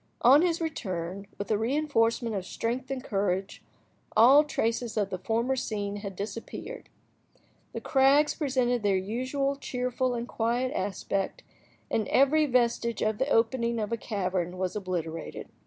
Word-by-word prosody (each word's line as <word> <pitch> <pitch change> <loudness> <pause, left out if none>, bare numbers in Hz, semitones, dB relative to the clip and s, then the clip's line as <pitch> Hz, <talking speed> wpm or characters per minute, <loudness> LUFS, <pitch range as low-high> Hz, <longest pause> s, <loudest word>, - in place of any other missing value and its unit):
On 270 +5 +8
his 335 -1 +1
return, 195 - -4
with 200 - -4
a 210 - +2
reinforcement 235 -3 +1
of 190 - -2
strength 240 +7 -3
and 265 -2 -3
courage, 195 -3 -1 0.6
all 265 +7 +8
traces 230 -5 -2
of 205 -2 0
the 185 - -3
former 235 +6 0
scene 205 -4 -3
had 200 -2 -6
disappeared. 225 - -7 0.8
The - - -4
crags 275 +2 +4
presented 255 -5 0
their 200 -2 +2
usual 255 +8 -1
cheerful 250 -1 -1
and 235 0 -4
quiet 240 +4 -1
aspect, 195 - -2 0.5
and 220 - 0
every 295 +3 +4
vestige 235 -2 +1
of 215 0 0
the 265 - +1
opening 235 -1 +2
of 215 -1 -2
a - - +2
cavern 185 -5 -2
was 185 +1 -2
obliterated. 170 -5 -4
230 Hz, 145 wpm, -28 LUFS, 200-260 Hz, 0.8 s, On